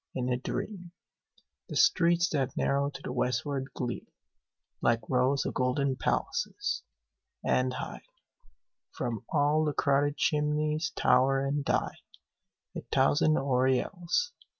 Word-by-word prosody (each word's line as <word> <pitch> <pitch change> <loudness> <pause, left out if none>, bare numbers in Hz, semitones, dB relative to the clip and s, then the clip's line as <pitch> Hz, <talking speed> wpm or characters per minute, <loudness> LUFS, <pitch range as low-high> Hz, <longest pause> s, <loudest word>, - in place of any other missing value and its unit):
In 125 -1 -1
a - - 0
dream 175 - -5 0.8
The - - -5
streets 170 0 +4
that 135 -4 -1
narrow 140 +1 +1
to 140 - -10
the - - -4
westward 130 +2 -1
gleam 120 -2 -4 0.7
Like 115 -2 +1
rows 130 +2 +2
of - - -2
golden 130 +1 0
palaces; 415 - -1 0.6
and 130 0 +2
high 130 - -6 0.9
From 120 0 -4
all 150 +1 +2
the 150 -1 0
crowded 145 +1 +1
chimneys 150 +2 +1
tower 135 +2 +3
and 140 +1 -1
die - - -1 0.8
A - - -4
thousand 155 - +3
aureoles. 135 - 0
140 Hz, 120 wpm, -29 LUFS, 130-155 Hz, 0.9 s, streets